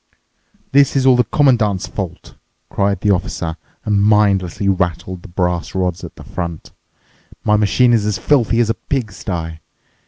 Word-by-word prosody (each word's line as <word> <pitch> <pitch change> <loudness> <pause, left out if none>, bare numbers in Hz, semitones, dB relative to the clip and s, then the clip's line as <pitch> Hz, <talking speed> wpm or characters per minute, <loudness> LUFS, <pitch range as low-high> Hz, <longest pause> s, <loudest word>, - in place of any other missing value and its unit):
"This 140 +1 +4
is 135 -1 +2
all 130 -1 +6
the 125 - +4
Commandant's 115 -7 +2
fault!" - - -7 0.4
cried 100 0 0
the 105 - +2
officer 85 -3 -2 0.3
and 105 -1 +2
mindlessly 100 -3 +2
rattled 90 -1 -1
the - - -12
brass 90 -1 -2
rods 90 -2 -1
at - - -9
the - - -12
front. 85 -3 -6 0.7
"My 105 - +3
machine's 110 +1 +3
as 105 - 0
filthy 120 -5 +2
as 115 -1 +1
a - - +1
pigsty." 95 - -4
100 Hz, 150 wpm, -18 LUFS, 90-115 Hz, 0.7 s, all